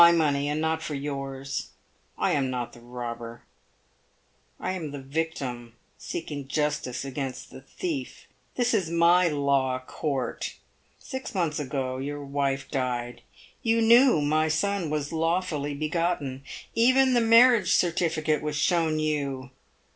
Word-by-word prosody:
money, 145 -4 +2
and 150 +1 -1
not 160 0 0
for 150 - -4
yours. 135 -1 -4 0.5
I - - +1
am 135 -3 +1
not 120 -2 -3
the - - -13
robber 120 -1 -7 0.6
— - - -40
I 185 - -2
am 175 -5 -4
the 145 - -6
victim 135 -5 -4 0.2
seeking 145 -4 -5
justice 150 -3 -1
against 135 -1 -5
the - - -10
thief. 290 - -5 0.3
This 245 -1 +1
is 190 -7 +1
my 170 +2 +5
law 140 -4 +1
court. 135 +1 -3 0.4
Six 260 -3 -7
months 165 -5 0
ago 130 -2 -2
your 145 +1 -4
wife 140 -1 -1
died. 125 -3 -2 0.4
You 230 -2 +2
knew 235 - +6
my 155 +2 +2
son 170 +2 0
was 150 0 -2
lawfully 165 -3 0
begotten. 155 -3 -2 0.3
Even 255 +3 +4
the 240 - +4
marriage 230 -1 +6
certificate 160 -3 +1
was 150 -1 -3
shown 160 0 +2
you. 140 -4 -2
150 Hz, 135 wpm, -27 LUFS, 135-170 Hz, 0.6 s, knew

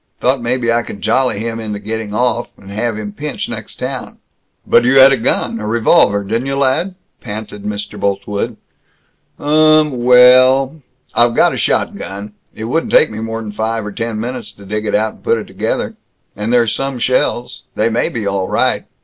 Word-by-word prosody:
Thought 130 +1 +1
maybe 120 -1 0
I 120 - +2
could 100 -3 -9
jolly 120 +1 +1
him 115 +1 -4
into 105 -2 -4
getting 110 0 -5
off, 120 +2 0
and 100 0 -13
have 110 +2 -2
him 105 -1 -5
pinched, 150 +6 -5
next - - -7
town." - - -5 0.5
"But - - +4
you 125 +3 +4
had 135 +1 +9
a - - +4
gun 115 -1 0
a 105 - -4
revolver 105 -2 +3
didn't 115 +6 -2
you, 135 - -1
lad?" 140 +8 0 0.3
panted 105 -2 -7
Mr. 105 0 -5
Boltwood. 100 +1 -2 0.8
"Um, 155 0 +4
wellllll 130 +4 +6 0.3
I've 120 0 +3
got - - +4
a - - -3
shotgun. 100 +2 -2 0.2
It 110 - -7
wouldn't 130 +9 -1
take 155 - +5
me 110 - -6
more 115 0 -4
'n 105 -2 -6
five 110 +1 -2
or 105 - -5
ten 115 +1 -4
minutes 120 0 -5
to 100 - -15
dig 105 +2 -3
it - - +1
out, 110 +1 0
and - - -21
put 115 - +2
it 110 - -5
together. - - -3 0.4
And 105 +3 -3
there's 120 -3 +3
some 135 -1 -2
shells. 125 0 0
They 110 +2 +1
may 115 +1 0
be 110 -3 -4
all 100 -1 -1
right. - - 0
115 Hz, 190 wpm, -16 LUFS, 105-125 Hz, 0.8 s, had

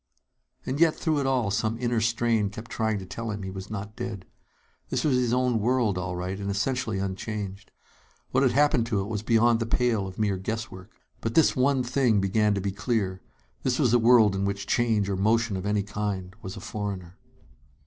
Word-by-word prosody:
And 135 +3 -2
yet, 165 -1 +5
through 155 -3 0
it 135 - 0
all, 125 -6 +1
some 110 +3 0
inner 120 -1 0
strain 115 -2 +1
kept 110 +3 -10
trying 110 -1 0
to 95 - -6
tell 115 +5 -5
him 105 -2 -4
he 95 - -5
was 95 +1 -7
not 105 0 -6
dead. 115 -7 -5 0.6
This - - -1
was 145 -4 +2
his 125 -2 +1
own 125 -2 +2
world, 120 -2 +1
all 90 0 -3
right, 90 +2 -4
and 100 0 -3
essentially 110 +1 -1
unchanged. 100 +1 -4 0.6
What 130 - +2
had 130 -3 +3
happened 140 -4 +3
to 110 -4 0
it - - -3
was 105 -2 -3
beyond 115 +1 +3
the 115 - -2
pale 115 -4 +1
of 95 - -9
mere 105 -3 +1
guesswork. 100 -1 -5 0.3
But 115 - -3
this 160 - +5
one 135 0 +2
thing 125 -3 +2
began 105 +2 +2
to 100 - -1
be 100 +1 -1
clear: 100 -2 -1 0.4
This 130 -1 0
was 125 -6 +2
a 120 - +6
world 115 -3 +6
in 95 - -1
which 100 0 -2
change 110 -3 +1
or 100 - -1
motion 110 +2 +2
of 95 +1 -3
any 105 -1 +1
kind 100 -2 -4
was 95 - -7
a - - -8
foreigner. 100 -4 -5
110 Hz, 210 wpm, -26 LUFS, 100-120 Hz, 0.6 s, a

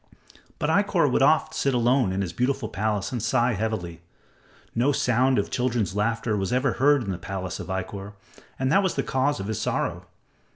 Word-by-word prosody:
But - - 0
Ikkor - - +2
would - - +2
oft - - +3
sit 135 -2 0
alone 120 -3 +2
in 95 +1 -1
his 90 -3 -3
beautiful 125 -2 -1
palace 105 0 -2
and 120 -3 -3
sigh 120 +2 +2
heavily. 90 -6 -3 0.7
No 125 +5 +2
sound 130 0 +2
of 100 - -1
children's 120 -7 -1
laughter 110 +1 0
was 95 -2 -2
ever 130 0 +1
heard 145 -1 +4
in 100 - -3
the 90 - -4
palace 95 -1 -5
of - - -7
Ikkor, 95 +2 -5 0.4
and 130 0 0
that 195 - +5
was 190 -3 -1
the 135 - 0
cause 135 +1 0
of 95 - -4
his 110 0 -3
sorrow. - - -2
115 Hz, 195 wpm, -25 LUFS, 100-130 Hz, 0.7 s, that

